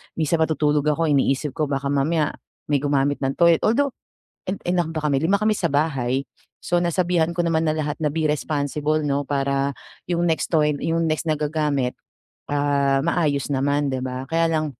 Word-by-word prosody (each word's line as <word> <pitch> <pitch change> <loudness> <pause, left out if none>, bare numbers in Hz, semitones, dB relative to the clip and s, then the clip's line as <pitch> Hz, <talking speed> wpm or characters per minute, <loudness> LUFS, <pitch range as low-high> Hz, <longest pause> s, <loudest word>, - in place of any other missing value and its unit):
minsan 160 +1 0
matutulog 150 -2 +1
ako 155 +1 +1
iniisip 140 +1 +1
ko, 150 +1 -2
baka 140 0 -2
mamaya 150 +2 +1 0.4
may 140 - +3
gumamit 140 0 +1
ng 135 -1 -1
toilet. 170 -1 +5
Although, 280 +5 +2 0.6
i 190 - -1 0.2
ilan 175 -3 0
ba 155 - -2
kami? 140 -2 +1
Lima 195 +5 +3
kami 215 +1 +1
sa 170 - +1
bahay, 135 -3 0 0.4
so 175 0 +1
nasabihan 175 -1 +1
ko 175 - +1
naman 165 -1 +1
na 155 - 0
lahat 150 -1 -2
na, 150 - +2
"Be 160 +2 -2
responsible, 150 +1 -1
'no." 140 0 0
Para 140 -1 0 0.3
yung 175 0 0
next 160 -1 0
to 155 -1 +4
line, 150 -1 0
yung 165 0 0
next 155 +1 -1
na 155 - +2
gagamit, 150 -4 0 0.6
ah, 140 -1 +1
maayos 150 -6 0
naman, 140 +1 +1
'di 130 - -2
ba? 130 0 -4
Kaya 165 0 +3
lang 155 -1 0
150 Hz, 185 wpm, -22 LUFS, 140-165 Hz, 0.6 s, toilet